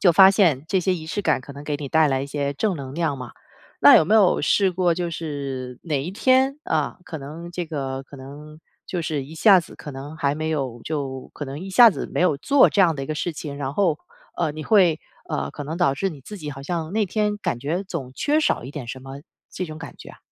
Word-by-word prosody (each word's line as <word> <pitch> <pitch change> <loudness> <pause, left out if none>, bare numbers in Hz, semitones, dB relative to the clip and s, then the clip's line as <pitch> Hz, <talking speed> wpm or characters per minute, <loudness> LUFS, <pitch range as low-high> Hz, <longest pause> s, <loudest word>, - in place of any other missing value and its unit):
就 180 - +6
发 190 +3 +8
现 160 -9 +3
这 190 +1 +1
些 185 +1 +1
仪 160 -3 -5
式 205 +5 -3
感 - - +2
可 140 +3 -11
能 140 +1 -10
给 150 -1 -2
你 145 -1 -6
带 160 0 +4
来 135 -1 0
一 - - -4
些 140 0 -2
正 190 +7 0
能 135 -2 -7
量 160 -3 -1
嘛。 125 -2 -8 0.5
那 - - +10
有 - - +5
没 215 - +2
有 200 -4 +5
试 185 +6 +3
过 175 -1 +1
就 175 -1 -2
是 140 -6 -5
哪 150 -5 -1
一 170 +7 -5
天， 260 +5 +3
啊， - - -1
可 160 - -6
能 155 +5 -8
这 175 0 -4
个 135 -3 -4
可 140 - -13
能 145 +3 -11 0.3
就 175 -3 -3
是 150 -4 -2
一 155 +4 -11
下 195 +2 +6
子 170 - -7
可 145 - -9
能 140 +3 -8
还 145 -1 0
没 155 0 -2
有 130 -6 -3
就 135 -4 -4
可 145 - -5
能 140 +1 -6
一 190 +3 -7
下 230 +4 +8
子 - - -5
没 - - -3
有 180 -6 +3
做 275 - +4
这 200 - +2
样 170 -4 +5
的 135 - -5
一 - - -5
个 155 - -3
事 175 +2 -2
情， 145 -2 -7
然 140 0 -4
后， 170 -7 +2 0.4
呃， 160 -4 0
你 155 0 -6
会， 180 -7 +4 0.3
呃， 70 0 -2
可 145 - -7
能 160 +3 -5
导 175 -6 +2
致 195 +7 -1
你 145 -5 -11
自 210 +9 -9
己 150 -4 -7
好 135 -1 -7
像 165 +2 -3
那 215 -1 +2
天 210 +2 -1
感 120 - -2
觉 160 +9 -2
总 155 -10 -6
缺 300 +1 +1
少 315 - +1
一 130 - -8
点 145 -5 -7
什 130 +2 -6
么 135 +1 -9 0.3
这 185 - -4
种 155 -2 -8
感 165 - -9
觉 - - -11
啊？ - - -16
155 Hz, 280 characters per minute, -23 LUFS, 140-180 Hz, 0.5 s, 那